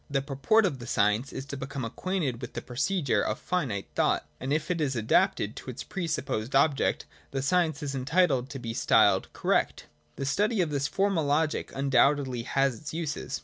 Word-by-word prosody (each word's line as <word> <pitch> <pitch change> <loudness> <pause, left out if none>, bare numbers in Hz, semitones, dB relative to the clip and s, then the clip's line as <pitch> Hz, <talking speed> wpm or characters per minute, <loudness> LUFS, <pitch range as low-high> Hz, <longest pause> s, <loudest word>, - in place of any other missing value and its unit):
The 135 -1 0
purport 145 +11 +2
of 140 -9 -1
the 120 - -8
science 105 +5 +1
is 135 - -6
to 140 - -6
become 135 -1 -5
acquainted 140 -1 -2
with 125 - -7
the - - -4
procedure 145 +4 0
of - - -1
finite 135 - -2
thought: - - +1
and, 130 - -4
if 155 +4 0
it 170 -2 -1
is 135 -3 0
adapted 110 -2 +1
to - - -8
its 125 - -6
pre 190 -4 -4
supposed 135 -5 -2
object, 140 0 +2 0.2
the 135 -1 -3
science 160 -1 +1
is 140 -1 -3
entitled 135 -1 +1
to 135 - -6
be 115 -3 -5
styled - - +3
correct. - - 0 0.3
The 135 - -4
study 205 - +1
of 170 -4 +1
this 140 -1 0
formal 195 -5 +1
logic 150 +2 0
undoubtedly 135 -1 +2
has 135 0 0
its 155 +1 -7
uses. 150 -4 -3
140 Hz, 190 wpm, -28 LUFS, 130-160 Hz, 0.3 s, styled